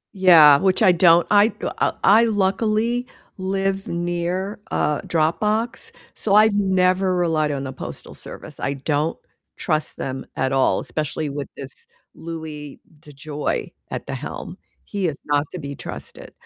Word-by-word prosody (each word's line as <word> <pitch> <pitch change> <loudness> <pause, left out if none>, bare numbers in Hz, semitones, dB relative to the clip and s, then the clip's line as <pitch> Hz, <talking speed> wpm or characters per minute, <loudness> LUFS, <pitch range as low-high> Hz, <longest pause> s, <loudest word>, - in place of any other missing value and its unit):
Yeah, 165 -7 +8
which 190 +2 +2
I 185 - +7
don't 170 -1 +5
I, 205 +2 +5 0.3
uh, - - +2
I 220 +4 +6
luckily 220 +4 0 0.3
live 195 +1 -1
near 175 +4 -2
a 150 -1 0
drop 160 0 +1
box, 220 +3 -1 0.2
so 205 -1 0
I've 215 0 +6
never 185 -1 +2
relied 160 -4 +1
on 140 -1 -3
the 130 - -5
postal - - -8
service. - - -10
I 140 - -2
don't 145 +3 -1 0.4
trust 155 -2 -1
them 130 0 -5
at 130 0 0
all, 135 -1 +2
especially 150 +3 -3
with 140 0 -5
this 135 -1 -10 0.3
Louis 160 -3 -8 0.2
DeJoy 150 0 -4 0.2
at - - -5
the - - -5
helm. - - -7 0.3
He 200 -4 -2
is 145 - -3
not 145 0 +1
to 180 - -6
be 140 -1 -6
trusted. - - -8
170 Hz, 150 wpm, -22 LUFS, 150-195 Hz, 0.4 s, Yeah